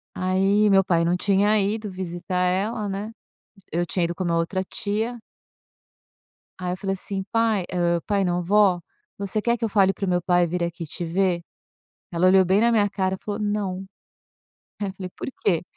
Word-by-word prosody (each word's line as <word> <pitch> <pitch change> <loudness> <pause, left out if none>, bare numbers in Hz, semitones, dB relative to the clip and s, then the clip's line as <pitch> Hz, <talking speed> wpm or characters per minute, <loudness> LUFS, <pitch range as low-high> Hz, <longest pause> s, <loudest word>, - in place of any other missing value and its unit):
Aí 195 +3 +2
meu 195 -1 +5
pai 170 -3 +2
não 175 +1 +2
tinha 205 +3 +3
ido 210 +1 -1
visitar 180 0 -3
ela, 205 +4 0
né. 200 +3 -4 0.6
Eu 170 +2 0
tinha 180 0 0
ido 170 +1 -2
com 185 +1 -3
uma 170 -1 +1
outra 180 +3 0
tia 220 +4 -3 1.4
aí 180 -1 -2
eu - - -3
falei 195 0 -2
assim: 195 0 -4
"Pai, 225 -4 +2
hã, 170 -1 +1
pai 200 -2 +1
não, 180 0 0
vó, 195 -1 +4 0.4
você 200 +1 -2
quer 235 +2 +1
que 230 - -4
eu - - +1
fale 195 -2 +4
para 195 - -5
o - - -2
meu 180 -1 +2
pai 175 0 +3
vir 175 +1 -2
aqui 170 0 -3
te 175 - -6
ver?". 175 +1 +1 0.7
Ela 170 +1 +2
olhou 190 0 +6
bem 190 +3 +3
na 235 - +4
minha 210 -3 +3
cara, 190 -1 -1
falou: 205 +1 -5
"Não". 205 -3 -2 1.0
Aí 205 - 0
eu 190 - -5
falei: 185 -1 -7
"Por - - -6
quê?", 170 -5 +2
190 Hz, 195 wpm, -24 LUFS, 180-205 Hz, 1.4 s, olhou